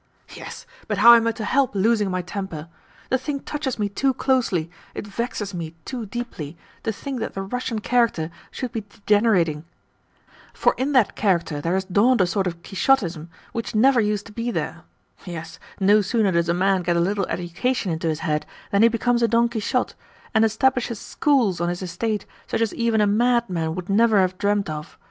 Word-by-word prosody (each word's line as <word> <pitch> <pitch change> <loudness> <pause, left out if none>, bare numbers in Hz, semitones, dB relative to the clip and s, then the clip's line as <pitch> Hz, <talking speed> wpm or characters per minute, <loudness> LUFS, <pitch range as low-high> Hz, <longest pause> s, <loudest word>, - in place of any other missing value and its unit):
"Yes, - - -9 0.2
but - - -1
how 235 - +9
am 230 -1 +5
I - - +3
to 220 - -5
help 265 -3 +1
losing 210 0 +2
my 185 -1 -2
temper? 175 -4 -6 0.4
The 260 - +3
thing 280 +1 -3
touches 295 -4 -3
me 210 -2 0
too 260 +6 0
closely, 195 -11 +1 0.2
it - - -5
vexes 210 -1 -4
me 165 -2 -5
too 245 -5 -5
deeply 195 -9 -6 0.2
to 225 - -1
think 265 +4 -5
that 225 - -4
the 195 - -3
Russian 240 +3 -3
character 230 -10 +1 0.2
should 255 -3 -5
be 225 - -3
degenerating. 205 -6 +1 0.9
For - - +3
in 275 +3 -1
that 255 -6 +3
character 170 -7 0
there 170 +4 0
has 190 0 -1
dawned 215 +7 +3
a 185 - +5
sort 190 +1 0
of 170 -1 -6
Quixotism 180 - +1 0.2
which 230 -1 -4
never 250 +2 +5
used 210 -1 -1
to - - -12
be 230 +3 -3
there. - - -4 0.4
Yes, 170 -3 -7 0.2
no 205 +2 +5
sooner 210 -1 +1
does 170 -1 +1
a - - +3
man 190 +1 +2
get 175 -1 0
a - - +3
little 195 +3 0
education 185 +5 -2
into 165 +1 -2
his 160 0 -1
head 150 -1 -1 0.2
than 200 - +3
he 230 - +8
becomes 240 +1 +1
a 235 - +4
Don 235 +1 +3
Quixote, 235 +2 -1 0.4
and 220 -1 +4
establishes 240 +1 +1
schools 240 - +1
on 175 - +1
his 175 +1 -4
estate 205 +4 -2 0.2
such - - -1
as 225 - +1
even 230 -2 +1
a - - +4
madman 205 -7 +1
would 180 -1 -5
never 215 +1 +4
have 185 -1 +1
dreamed 205 0 +1
of. 155 0 -7
205 Hz, 195 wpm, -23 LUFS, 180-235 Hz, 0.9 s, how